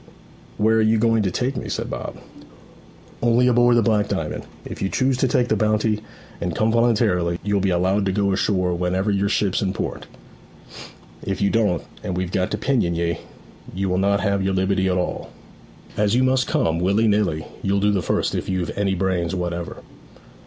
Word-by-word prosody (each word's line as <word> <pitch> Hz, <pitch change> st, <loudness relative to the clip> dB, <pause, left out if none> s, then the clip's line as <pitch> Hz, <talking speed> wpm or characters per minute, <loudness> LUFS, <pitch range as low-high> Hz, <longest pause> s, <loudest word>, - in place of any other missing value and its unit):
'Where 110 Hz, +1 st, +3 dB
are -, -, +4 dB
you 110 Hz, +1 st, +3 dB
going 115 Hz, 0 st, +2 dB
to 100 Hz, -, +1 dB
take 125 Hz, +8 st, -2 dB
me?' -, -, -5 dB
said -, -, -3 dB
Bob. -, -, -5 dB, 1.0 s
'Only 120 Hz, +1 st, +3 dB
aboard 120 Hz, -1 st, +4 dB
the 115 Hz, -, +3 dB
Black 105 Hz, -2 st, +2 dB
Diamond. -, -, -3 dB, 0.2 s
If -, -, -8 dB
you 95 Hz, -, 0 dB
choose 130 Hz, +4 st, +1 dB
to 130 Hz, -, +2 dB
take 125 Hz, 0 st, +1 dB
the -, -, +1 dB
bounty 110 Hz, 0 st, +1 dB, 0.4 s
and 85 Hz, -1 st, -2 dB
come 110 Hz, +1 st, +2 dB
voluntarily, 110 Hz, -7 st, +2 dB
you'll 100 Hz, -1 st, +1 dB
be 95 Hz, -, +1 dB
allowed 95 Hz, +3 st, +1 dB
to -, -, +1 dB
go 100 Hz, +1 st, +1 dB
ashore 95 Hz, -2 st, +1 dB
whenever 90 Hz, +3 st, 0 dB
your 100 Hz, 0 st, +1 dB
ship's 100 Hz, -2 st, +1 dB
in 95 Hz, -1 st, -1 dB
port. -, -, -5 dB, 1.1 s
If 95 Hz, -, -3 dB
you 100 Hz, -, +2 dB
don't, 105 Hz, -7 st, +1 dB, 0.2 s
and 90 Hz, -, -4 dB
we've 90 Hz, -1 st, -2 dB
got 95 Hz, -1 st, 0 dB
to 105 Hz, -, -2 dB
pinion 110 Hz, -8 st, 0 dB
ye, 85 Hz, 0 st, -1 dB, 0.6 s
you 95 Hz, 0 st, -1 dB
will 90 Hz, 0 st, +1 dB
not 100 Hz, +1 st, +2 dB
have 100 Hz, -2 st, +1 dB
your 95 Hz, 0 st, 0 dB
liberty 95 Hz, 0 st, +1 dB
at 90 Hz, -1 st, +1 dB
all. 90 Hz, -, -3 dB, 0.7 s
As 105 Hz, +1 st, +1 dB
you 130 Hz, -, +3 dB
must 130 Hz, -3 st, +2 dB
come, 80 Hz, 0 st, +1 dB
willy 100 Hz, +5 st, +2 dB
nilly, 100 Hz, -7 st, +1 dB, 0.2 s
you'll 100 Hz, +1 st, +1 dB
do 105 Hz, +1 st, +2 dB
the 100 Hz, -2 st, 0 dB
first -, -, -1 dB
if -, -, -3 dB
you've 95 Hz, -2 st, -2 dB
any 100 Hz, -1 st, 0 dB
brains 90 Hz, -1 st, -1 dB
whatever.' 85 Hz, -1 st, -4 dB
100 Hz, 195 wpm, -22 LUFS, 90-110 Hz, 1.1 s, are